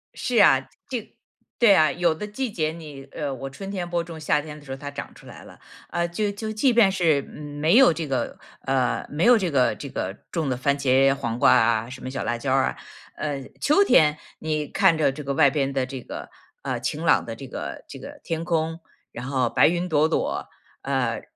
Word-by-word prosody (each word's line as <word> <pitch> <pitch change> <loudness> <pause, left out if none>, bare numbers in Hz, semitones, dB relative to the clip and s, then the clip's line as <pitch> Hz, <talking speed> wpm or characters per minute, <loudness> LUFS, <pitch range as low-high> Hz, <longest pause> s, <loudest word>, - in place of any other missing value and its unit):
是 245 -2 -2
啊。 135 -7 +5 0.2
这 235 -4 -5 0.4
对 225 -5 +6
啊， 155 -1 +4
有 170 -2 +1
的 210 +6 -6
季 240 +2 -3
节 155 -4 -1
你 150 -4 -10
呃， 145 -3 -3
我 135 +1 -6
春 195 +9 -8
天 180 -3 -4
播 170 -1 0
种， 165 -1 -9
夏 150 -1 +1
天 150 0 -9
的 145 - -17
时 135 - -9
候 135 - -4
它 145 +1 -7
长 145 0 -7
出 - - -16
来 - - -12
了。 - - -15 0.3
呃， 170 0 -1
就 205 +4 -1
就 215 +2 -5
即 240 +4 +2
便 215 -5 +5
是 165 -7 +2
没 150 - 0
有 265 -11 +7
这 160 -1 -4
个 135 -2 -2 0.2
呃， 130 -2 0
没 150 +4 -2
有 245 -1 +7
这 185 -4 -1
个 130 -3 +3
这 140 - -8
个 95 -4 -3 0.2
种 160 -5 -1
的 125 - -1
番 140 +2 +1
茄、 135 0 +4
黄 115 -3 -3
瓜 - - +6
啊， 115 -1 +2
什 130 - -9
么 130 - -5
小 130 - -4
辣 120 - -1
椒 130 +2 -1
儿 135 -1 +3
啊， - - -4 0.4
呃， 145 -3 -3 0.2
秋 305 +8 +4
天 150 - +5 0.2
你 155 -2 -2
看 165 - +3
着 145 -3 +2
这 145 +2 -8
个 140 - -2
外 140 -1 +5
边 140 -1 -1
的 135 -1 0
这 130 -1 -7
个， - - -8 0.3
呃， - - -3
晴 - - -3
朗 - - +4
的 - - -6
这 - - -9
个 - - -6
这 - - -10
个 - - -10
天 165 0 -3
空， 165 -1 -1 0.3
然 120 - -7
后 130 -3 0
白 - - +4
云 175 +2 0
朵 155 -1 +3
朵， - - -1 0.3
呃， 130 -4 -1
150 Hz, 245 characters per minute, -24 LUFS, 135-170 Hz, 0.4 s, 有